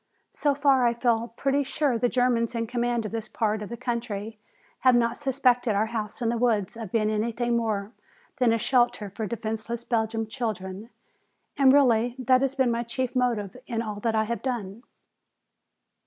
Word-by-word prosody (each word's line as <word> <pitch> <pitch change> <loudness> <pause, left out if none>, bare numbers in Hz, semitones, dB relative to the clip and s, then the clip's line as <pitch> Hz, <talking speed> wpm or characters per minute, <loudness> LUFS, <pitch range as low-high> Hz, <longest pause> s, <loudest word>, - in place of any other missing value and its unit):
So 290 -2 0
far 275 -2 +3
I 235 -1 +3
feel 235 -1 +1
pretty 275 +1 +1
sure 280 -1 0
the 245 - +2
Germans 245 -1 +1
in 230 0 -1
command 240 -1 -1
of 215 - -4
this 225 -1 -4
part 215 -1 -1
of 210 - -6
the 235 - -6
country 225 -3 -4 0.4
have 255 -1 +5
not 235 -1 +2
suspected 250 -5 +1
our 210 +2 +2
house 220 0 -4
in 230 - +1
the 235 0 -1
woods 225 -4 +1
of 225 -5 -7
being 215 -2 +1
anything 235 +2 0
more 215 -3 -1 0.5
than 250 -4 +3
a 230 - +3
shelter 240 -3 +1
for 220 +2 -4
defenseless 225 +2 -4
Belgian 225 -1 -1
children. 215 -3 -5 0.7
And 270 -2 +6
really 245 -4 +4
that 255 0 +3
has 270 0 0
been 260 -3 +2
my 235 0 0
chief 245 +2 -3
motive 235 -6 0
in 230 -1 -2
all 210 -2 -5
that 225 +1 0
I 220 - +3
have 225 -1 -3
done." 230 -5 -4
235 Hz, 185 wpm, -26 LUFS, 220-250 Hz, 0.7 s, And